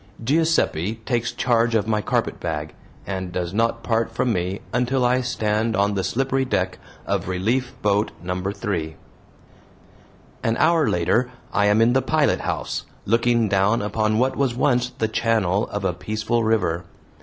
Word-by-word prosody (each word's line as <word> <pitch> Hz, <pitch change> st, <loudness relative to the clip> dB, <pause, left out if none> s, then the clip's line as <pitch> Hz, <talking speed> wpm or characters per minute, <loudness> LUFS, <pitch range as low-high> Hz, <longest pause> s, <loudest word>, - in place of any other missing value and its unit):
Giuseppe 135 Hz, -, +1 dB
takes 120 Hz, -2 st, 0 dB
charge 115 Hz, -2 st, +1 dB
of 105 Hz, -1 st, +1 dB
my 105 Hz, -1 st, +1 dB
carpetbag, 75 Hz, -5 st, -2 dB, 0.3 s
and 95 Hz, -2 st, -4 dB
does 90 Hz, 0 st, -3 dB
not 115 Hz, +1 st, 0 dB
part 115 Hz, -1 st, +1 dB
from 125 Hz, -, 0 dB
me 90 Hz, +1 st, -2 dB
until 125 Hz, +1 st, +1 dB
I 125 Hz, +1 st, +3 dB
stand 110 Hz, -2 st, 0 dB
on 100 Hz, 0 st, +2 dB
the 95 Hz, -1 st, -1 dB
slippery 135 Hz, +6 st, 0 dB
deck 95 Hz, -8 st, -1 dB, 0.3 s
of -, -, -1 dB
"Relief 115 Hz, +8 st, -1 dB
Boat 105 Hz, +1 st, +2 dB
No. 90 Hz, +1 st, -3 dB
3." 90 Hz, -6 st, -3 dB, 1.5 s
An 115 Hz, +1 st, 0 dB
hour 165 Hz, -2 st, +3 dB
later 95 Hz, +9 st, +1 dB, 0.2 s
I 105 Hz, 0 st, +3 dB
am 105 Hz, +2 st, +4 dB
in 120 Hz, +2 st, +3 dB
the 135 Hz, -, +3 dB
pilothouse, 155 Hz, 0 st, 0 dB, 0.2 s
looking 115 Hz, +1 st, +2 dB
down 100 Hz, +3 st, +2 dB
upon 110 Hz, +1 st, 0 dB
what 130 Hz, +3 st, +1 dB
was 135 Hz, -4 st, 0 dB
once 125 Hz, -1 st, +2 dB
the 110 Hz, -, -2 dB
channel 110 Hz, -3 st, +1 dB
of 105 Hz, -1 st, -4 dB
a 90 Hz, -, +1 dB
peaceful 110 Hz, +5 st, -1 dB
river. 90 Hz, -6 st, +1 dB
110 Hz, 155 wpm, -23 LUFS, 95-120 Hz, 1.5 s, am